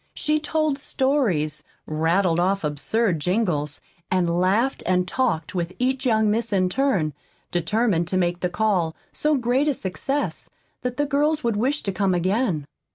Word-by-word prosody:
She 305 0 +1
told 310 -2 0
stories, 240 - 0 0.2
rattled 165 +3 +1
off 195 +2 +1
absurd 165 +6 0
jingles, 155 -5 0 0.3
and 185 -2 +2
laughed 210 +9 +2
and 180 0 +2
talked 220 -10 -1
with 175 -1 -2
each 260 +1 0
young 220 -2 +3
miss 230 +1 0
in 185 -2 +2
turn, 190 - +1 0.4
determined 175 0 +1
to 185 - 0
make 175 -1 0
the 180 - -1
call 180 -5 0 0.2
so 300 0 +1
great 255 +3 +1
a 290 - +2
success 270 +10 -3 0.3
that 250 0 -3
the 290 - +2
girls 300 +2 +1
would 235 -2 +1
wish 265 +8 0
to 195 - -1
come 190 -1 +1
again. 185 - 0
200 Hz, 160 wpm, -23 LUFS, 175-260 Hz, 0.4 s, young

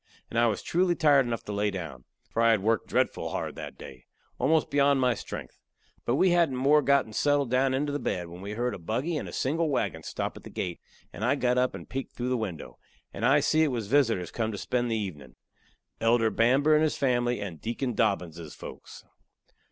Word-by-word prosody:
And 115 - +1
I 120 - +5
was 105 -3 -2
truly 175 0 +1
tired 145 -5 +4
enough 115 -1 -3
to - - -6
lay 105 0 0
down, 80 -11 -7 0.3
for 115 - 0
I 115 - +5
had 110 -4 +3
worked 115 +1 +1
dretful - - 0
hard - - -3
that - - -8
day 65 -1 -11 0.3
almost 155 +4 +2
beyond 140 -1 +4
my 125 -1 +3
strength. - - -8 0.5
But 120 - +1
we 185 +5 +4
hadn't 170 -6 +3
more'n 140 +3 +3
got 140 -6 +2
settled 145 0 +1
down 130 +1 +2
into 145 +2 -1
the 145 - -2
bed, 90 -9 -2
when 85 +2 -10
we 100 +2 -5
heard 120 +3 -1
a - - -7
buggy 125 - -2
and 150 - -3
a - - -8
single 160 +4 0
wagon 95 - -1
stop - - -4
at - - -10
the - - -10
gate, 90 -2 -4 0.3
and 105 - -6
I 130 +5 +3
got 125 -2 +1
up 125 0 +1
and - - -9
peeked 135 0 -5
through 125 +1 -2
the 130 - +1
window, 100 -10 -5 0.3
and 110 - -6
I 135 +4 +5
see 155 +3 +2
it 160 - +4
was 115 -4 -2
visitors 115 -10 +2
come 110 -1 -2
to 100 - -5
spend 120 +3 -1
the 115 - 0
evenin.' 75 - -6 0.6
Elder 115 -1 +3
Bamber 135 +6 +3
and 155 - +5
his 155 -1 +1
family, 120 -3 +1
and 95 -6 -6
Deacon 120 +2 -2
Dobbinses' 85 -8 -1
folks. - - -11
120 Hz, 220 wpm, -28 LUFS, 105-140 Hz, 0.6 s, I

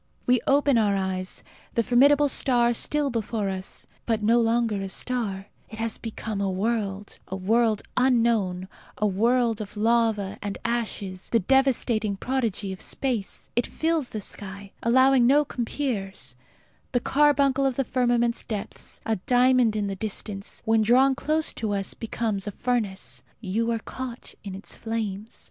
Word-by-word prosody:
We 250 -1 +3
open 280 -3 +4
our 205 -2 +2
eyes: 190 -1 -2 0.3
the 230 - +3
formidable 280 +5 +5
star 245 -3 +3
is 235 - 0
still 295 -2 +1
before 220 -3 -2
us; 190 0 -5 0.2
but, 220 -2 0
no 230 +3 +4
longer 225 -3 +1
a 195 - -4
star, 200 -4 -2 0.2
it 220 - -9
has 225 0 -3
become 220 -2 -4
a 195 - 0
world 200 0 -2
a 190 - -4
world 215 +3 +2
unknown, 230 -8 +2 0.3
a 215 - +1
world 230 +3 +2
of 210 0 -8
lava 220 -3 +1
and 205 -1 -4
ashes; 210 -5 -3
the 230 - +3
devastating 235 -3 +2
prodigy 220 -6 -2
of 185 - -9
space. 245 -7 -2
It 240 - +1
fills 320 -4 0
the 215 - -5
sky, 200 0 -6
allowing 260 +1 +5
no 290 +3 +5
compeers. 235 -6 -3 0.6
The 245 - +3
carbuncle 275 0 +3
of 265 - -1
the 270 - +1
firmament's 240 -1 +1
depths, 210 -3 -5
a 225 - 0
diamond 250 -2 +4
in 210 -1 0
the 195 -1 -3
distance, 200 0 -4
when 225 0 +3
drawn 255 +5 +5
close 310 +3 0
to 215 -2 -2
us 195 -1 -2
becomes 220 -3 -3
a - - -2
furnace. 220 -4 -2 0.2
You 225 +3 -1
are 230 - +1
caught 250 +2 -7
in 195 -2 -6
its 195 - -6
flames. 220 -2 -4
225 Hz, 160 wpm, -25 LUFS, 200-250 Hz, 0.6 s, formidable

